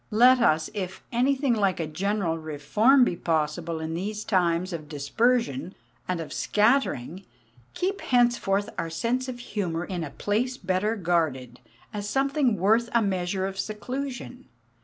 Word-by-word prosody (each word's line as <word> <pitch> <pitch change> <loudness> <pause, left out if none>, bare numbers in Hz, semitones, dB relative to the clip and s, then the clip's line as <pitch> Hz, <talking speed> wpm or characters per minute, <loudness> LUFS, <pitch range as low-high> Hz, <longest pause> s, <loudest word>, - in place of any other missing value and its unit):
Let 250 +4 +6
us, 155 -9 +3
if 190 -3 -5
anything 265 +2 +2
like 200 -5 +1
a 165 - -1
general 185 +2 -1
reform 160 - +3
be 175 - -1
possible 160 0 -1
in 160 0 -4
these 210 +5 -3
times 180 -2 +1
of 155 -3 -6
dispersion 165 - 0 0.3
and 185 -2 -1
of 165 - -6
scattering, 205 - +1 0.5
keep 390 +2 -1
henceforth 240 -5 +2
our 165 -1 -2
sense 235 +10 -1
of 255 -1 -5
humour 180 -8 -3
in 180 -3 -4
a 150 - -5
place 230 - -1
better 190 +3 0
guarded, 155 - -1 0.3
as 205 -1 -4
something 270 -2 +1
worth 220 +6 +3
a 235 -1 +4
measure 190 -1 -1
of 195 0 -5
seclusion. 250 +4 -5
195 Hz, 145 wpm, -26 LUFS, 165-240 Hz, 0.5 s, Let